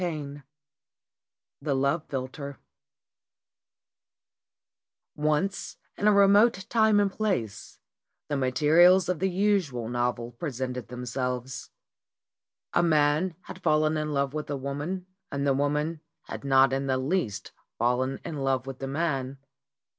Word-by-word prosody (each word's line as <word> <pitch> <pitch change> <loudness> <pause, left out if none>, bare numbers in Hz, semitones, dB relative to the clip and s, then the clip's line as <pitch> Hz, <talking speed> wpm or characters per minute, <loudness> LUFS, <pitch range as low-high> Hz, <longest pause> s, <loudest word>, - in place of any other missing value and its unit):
VI 150 -5 -4 1.2
THE 140 -3 0
LOVE 140 +4 0
PHILTER 140 +1 -5 2.6
*MP 150 - -8
ONCE, 155 +6 0 0.2
in 205 - 0
a - - +7
remote 200 0 +5
time 220 -3 +4
and 200 -1 +2
place, 185 - -3 0.5
the 145 - -2
materials 160 +7 +5
of 180 -4 0
the 190 +2 +1
usual 180 - 0
novel 120 -1 -1
presented 125 -2 -4
themselves. 125 +1 -4 1.0
A - - +4
man 155 +1 +2
had - - -11
fallen 155 0 +2
in 155 0 -2
love 140 -1 0
with 155 -1 -4
a 145 - -2
woman 145 +7 -4 0.3
and 140 0 -2
the 140 - +3
woman 150 +3 -1 0.2
had - - -8
not 135 -1 +4
in 135 +1 -1
the 130 -1 +1
least 130 - -2 0.3
fallen 125 +3 0
in 155 - -5
love 135 -2 0
with 135 -1 -7
the 135 - -4
man. 135 -3 -2
145 Hz, 130 wpm, -27 LUFS, 130-170 Hz, 2.6 s, a